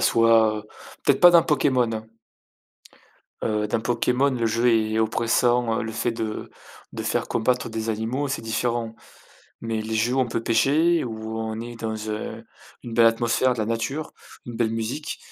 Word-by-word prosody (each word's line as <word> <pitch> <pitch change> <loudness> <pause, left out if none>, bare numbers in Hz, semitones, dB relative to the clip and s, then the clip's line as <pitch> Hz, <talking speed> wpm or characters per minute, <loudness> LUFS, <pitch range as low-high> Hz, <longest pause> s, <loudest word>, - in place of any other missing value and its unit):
soit 110 -2 +4 0.4
peut-être - - +3
pas 175 - +9
dans 170 -1 +6
Pokémon, 130 -6 +2
hein. 110 0 -5 1.3
Heu, 105 -1 -1
dans 110 +2 -1
Pokémon, 125 +4 +1
le 120 -3 -1
jeu 115 +2 +1
est 110 -1 +1
oppressant, 115 +1 +1
heu, - - -2
le 110 0 -5
fait 115 +1 -1
de 110 -1 -5 0.4
de - - -5
faire - - -1
combattre 125 +2 0
des 110 0 -4
animaux, 115 +6 -2
c'est 135 - -3
différent, 115 0 -2 0.7
mais 115 -1 -2
les 110 +1 -4
jeux 115 +3 +1
où 135 - +2
on 125 - 0
peut 115 0 -2
pêcher, 155 +9 +3
où 110 -1 -5
on 110 0 -4
est 120 0 -8
dans, 110 -1 -4
heu, 110 +1 -5 0.4
une 120 - -7
belle 115 0 +6
atmosphère 120 +2 +2
de - - -10
la 110 - 0
nature, 115 +7 -3 0.3
une 120 - -8
belle 115 -2 +1
musique, 115 +7 -4
115 Hz, 175 wpm, -24 LUFS, 110-125 Hz, 1.3 s, pas